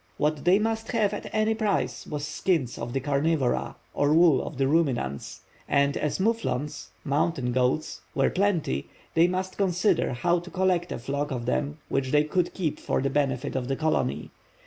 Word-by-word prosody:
What 150 -1 0
they 180 +2 +6
must 225 +2 -2
have 210 -3 +2
at 205 - -5
any 215 0 +2
price 215 -3 -1
was 150 -1 -3
skins 155 -4 -1
of 120 +1 -4
the 135 - +1
carnivora, 140 -1 0 0.2
or 145 0 +2
wool 165 -5 +5
of 145 - -7
the 135 0 +2
ruminants; 135 - 0 0.3
and 140 0 +3
as 150 - -1
moufflons 150 - -1 0.2
(mountain 140 -2 0
goats), 130 +4 0
were 135 - +2
plenty, 180 - 0 0.2
they 165 +2 +5
must 185 +1 -3
consider 190 -5 +2
how 170 +8 +1
to 175 +1 -10
collect 180 -2 +1
a - - -2
flock 140 +4 -2
of 125 -3 -3
them 145 +4 -1
which 135 -1 -1
they 150 +2 +4
could 175 +3 -1
keep 165 -6 -2
for - - -1
the 135 0 0
benefit 135 -3 0
of 125 -2 -1
the 135 - 0
colony. 75 - -1
150 Hz, 180 wpm, -26 LUFS, 135-180 Hz, 0.3 s, they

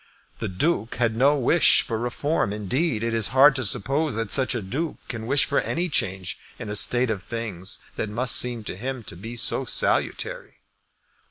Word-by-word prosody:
The 110 - -2
Duke 115 - 0
had 115 -2 0
no 135 +5 +4
wish 145 +6 +5
for 110 -2 -3
Reform. 120 0 -1
Indeed 110 - -1
it 115 0 -1
is 115 -3 +2
hard 140 +1 +7
to 130 - -2
suppose 130 +6 +1
that 115 -2 -3
such 130 -1 +2
a 120 - -2
Duke 145 - -4
can 115 -2 -6
wish 140 +2 +4
for 140 - +1
any 175 +2 -2
change 95 - -2 0.2
in - - -7
a - - -3
state 120 +3 +1
of 100 -3 -3
things 100 -4 -4 0.2
that 110 - -2
must 120 +4 +1
seem 120 -3 +3
to 105 - -5
him 130 +4 -5
to 90 - -7
be 115 +7 -8
so 115 - +2
salutary. - - -1
115 Hz, 190 wpm, -24 LUFS, 105-135 Hz, 0.2 s, hard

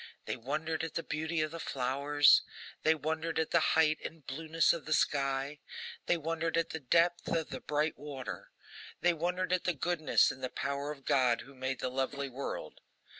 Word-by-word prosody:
They - - -2
wondered 155 +6 -2
at 165 - -4
the 165 - -1
beauty 160 +1 -1
of 155 0 -1
the 165 - -6
flowers; 140 +2 +4 0.4
they 160 +1 +4
wondered 160 +2 -2
at 160 -1 0
the 170 - +5
height 155 -1 +3
and 160 -4 -7
blueness 160 +3 +2
of 170 - -5
the 155 - 0
sky; 140 0 0 0.5
they 175 - +3
wondered 165 +1 -1
at 165 - 0
the 160 - -4
depth 170 +5 +2
of 165 -2 0
the - - -5
bright 150 +1 -1
water; 140 -3 -6 0.5
they 175 0 +4
wondered 180 +2 -1
at 180 - +1
the 180 - +1
goodness 155 0 +3
and 130 -1 -11
the 130 - -1
power 140 +2 -3
of 140 -3 -10
GOD 125 -3 +3
who 135 - -13
made 130 0 -3
the - - 0
lovely 135 +2 -2
world. 135 +2 -6
155 Hz, 190 wpm, -32 LUFS, 135-165 Hz, 0.5 s, the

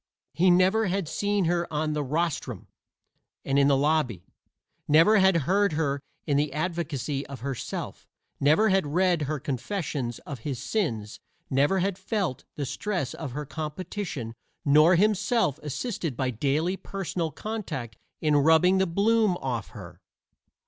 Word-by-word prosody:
He 185 +3 +3
never 190 +5 +4
had 190 -2 -1
seen 205 +3 0
her 170 0 0
on 155 0 -1
the 150 -1 -1
"rostrum" 145 - -2 0.8
and 135 +1 +2
in 140 - +5
the 140 -1 +4
lobby, 140 - +1 0.6
never 165 +8 +6
had 190 -3 +4
heard 200 +1 +2
her 140 -3 -1 0.2
in 145 -2 +2
advocacy 150 -4 -2
of 140 -4 -9
herself, 135 -2 -5 0.3
never 155 +10 +4
had 190 -5 +2
read 175 +2 +2
her 150 +1 -2
confessions 135 - -3
of 140 -4 -6
his 135 +2 -4
sins, 115 - -2 0.3
never 145 +8 +3
had 195 0 -1
felt 195 - -2
the 145 - -3
stress 145 +1 -3
of 140 -6 -6
her 150 +2 -4
competition, 155 - -5 0.3
nor 155 +5 +6
himself 210 - +2
assisted 155 - -4
by 130 -1 0
daily 145 - 0
personal 180 -4 -3
contact 155 - -5 0.3
in 150 -2 +3
rubbing 160 +6 +5
the 190 - +2
bloom 205 +2 +2
off 120 -7 -3
her. - - -11
155 Hz, 140 wpm, -27 LUFS, 140-190 Hz, 0.8 s, never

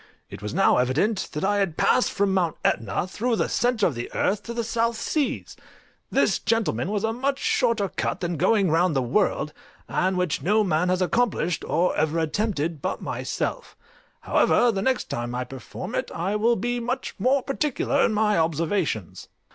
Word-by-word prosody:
It - - -9
was 105 - -4
now 195 +3 +3
evident 150 - +1
that 150 - -3
I 205 +1 +2
had 195 -6 0
passed 255 - +3
from 200 -1 +1
Mount 175 -4 0
Etna 105 - 0
through 230 +6 -1
the - - 0
centre 240 -4 +1
of 165 - +1
the 120 -1 -6
earth 205 +2 +1
to 235 - -7
the 235 - -1
South 230 0 0
Seas: 295 +4 -2 0.5
this, - - +2
gentlemen, 200 - 0
was 205 -1 -1
a 225 0 0
much 270 +3 -1
shorter 230 -7 +1
cut - - -3
than 175 -1 -2
going 195 +2 +2
round 165 0 +2
the 135 - +2
world, 150 - 0 0.3
and 185 0 0
which 180 -6 0
no 210 +8 +3
man 180 -2 +1
has 185 0 +2
accomplished, 185 -4 0
or 180 +2 +1
ever 155 +1 0
attempted, 165 -2 -1
but - - -3
myself; - - -4 0.4
however, 240 - +3
the 195 -3 -2
next 260 +3 +1
time 120 +1 -4
I 125 - -1
perform 130 -2 -8
it - - -2
I 185 +5 -1
will 230 +3 +3
be 245 +3 -2
much 245 +2 -3
more 265 +1 +2
particular 280 0 0
in - - +3
my 210 -3 +2
observations. 160 - -1
195 Hz, 185 wpm, -25 LUFS, 160-230 Hz, 0.5 s, now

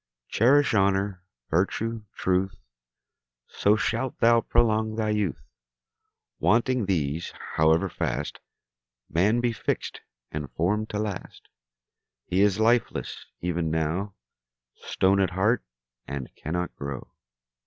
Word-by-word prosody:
Cherish 135 +5 +4
honour, 95 -2 +2 0.3
virtue, 110 +5 0
truth, 95 +1 0 0.9
So 105 +1 +2
shalt 115 +3 -1
thou 115 0 +5
prolong 110 -2 +2
thy 110 -1 0
youth. 105 -5 -1 1.0
Wanting 120 0 +2
these, 80 -3 -1 0.2
however 80 +4 +4
fast - - -3 0.7
Man 100 +9 +3
be 120 -1 +1
fix'd - - -3 0.3
and 75 -3 -4
form'd 105 +6 0
to 105 - -3
last, 105 -3 -5 0.8
He 95 +2 +1
is 105 0 +3
lifeless 115 +2 +1
even 85 -2 -1
now, 80 +5 -1 0.6
Stone 95 +1 +1
at 95 -2 +3
heart, 105 +6 +1 0.4
and 70 -2 -5
cannot 90 +3 -3
grow. 70 -2 -6
100 Hz, 110 wpm, -26 LUFS, 85-110 Hz, 1.0 s, thou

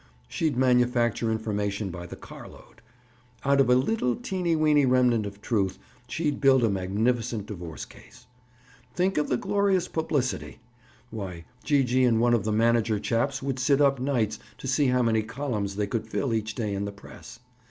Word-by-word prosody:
"She'd 155 - -1
manufacture 125 -3 +2
information 105 -2 -2
by 85 0 -7
the - - -8
car - - -11
load. - - -17 0.6
Out 140 0 +4
of 130 - +2
a 125 - +6
little, 130 - +1
teeny 180 +1 -1
weeny 150 -2 +4
remnant 125 -4 +3
of 100 0 -11
truth, 100 -5 0 0.3
she'd 150 -1 -2
build 135 -3 +5
a 115 - +3
magnificent 110 +4 -1
divorce 85 -7 -7
case. - - -17 0.7
Think 185 -2 +1
of 150 - 0
the 125 - +2
glorious 200 0 +1
publicity! 145 -5 -2 0.5
Why, 95 -6 -6 0.2
Gee 145 -2 +3
gee 130 +1 +2
and 115 -3 +3
one 120 +1 +3
of 115 -4 +1
the 110 - 0
manager 115 0 +2
chaps 130 +6 -1
would 135 -1 -2
sit 140 +1 +3
up 140 -2 +3
nights 120 -5 0 0.2
to - - -10
see 135 +2 +2
how 125 0 +2
many 110 -1 +2
columns 110 -4 -3
they 105 0 0
could 110 +2 -3
fill 130 -4 -1
each 110 -1 -2
day 105 -4 -2
in 100 +1 -2
the 100 - -4
press. 100 +3 -13
120 Hz, 180 wpm, -26 LUFS, 105-135 Hz, 0.7 s, a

